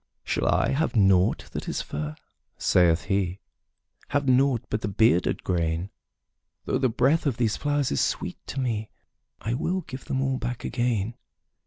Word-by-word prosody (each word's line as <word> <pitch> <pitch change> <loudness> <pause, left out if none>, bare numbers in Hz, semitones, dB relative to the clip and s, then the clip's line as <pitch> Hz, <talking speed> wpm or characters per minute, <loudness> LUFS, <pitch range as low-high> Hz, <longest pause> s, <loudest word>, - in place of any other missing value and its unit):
``Shall - - +1
I - - +2
have 155 +1 0
nought 95 -3 +3
that - - -5
is - - -2
fair?'' 75 +1 -4 0.4
saith 85 -2 +3
he; 95 -2 -1 0.7
``Have 145 0 +1
nought 130 -2 +3
but 110 - -1
the - - -2
bearded 100 -3 +2
grain? 85 +1 -1 0.7
Though 130 - 0
the 130 -2 +2
breath 140 +7 +2
of 125 -5 0
these 115 -3 +1
flowers 145 -2 0
is 70 - +1
sweet - - -2
to 135 - -4
me, 110 -4 -1 0.5
I 115 - -2
will 175 +9 -1
give 135 -5 -9
them 130 - -1
all 135 -1 0
back 125 0 -4
again.'' 120 -3 -1
115 Hz, 165 wpm, -26 LUFS, 95-135 Hz, 0.7 s, nought